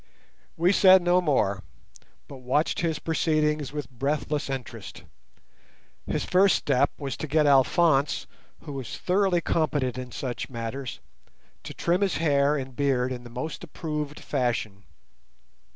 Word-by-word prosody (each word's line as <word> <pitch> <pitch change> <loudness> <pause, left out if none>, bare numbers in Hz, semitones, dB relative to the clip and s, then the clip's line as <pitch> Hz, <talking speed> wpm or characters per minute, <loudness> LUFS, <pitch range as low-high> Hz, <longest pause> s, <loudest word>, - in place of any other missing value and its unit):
We 175 +3 +3
said 190 -2 +6
no 180 +1 +3
more, 115 - +1 0.7
but 140 - -10
watched 130 +5 0
his 165 -3 0
proceedings 155 -3 0
with 145 -3 -5
breathless 145 +4 -2
interest. 125 -6 -7 1.0
His - - -1
first 190 +1 +4
step 140 0 +2
was 140 -3 -4
to 155 - -5
get 150 +1 +2
Alphonse, 140 +1 +3 0.4
who 150 - -8
was 135 -4 -6
thoroughly 185 -1 +1
competent 145 -7 0
in 125 -1 -7
such 125 -1 -5
matters, 120 +1 -5 0.6
to - - -7
trim 175 +3 0
his 195 -3 +1
hair 145 -2 +2
and 130 -2 -6
beard 130 -2 +1
in 125 -1 -5
the 120 - -11
most 125 +9 -6
approved 150 -3 -5
fashion. 115 -7 -2
145 Hz, 135 wpm, -26 LUFS, 130-160 Hz, 1.0 s, said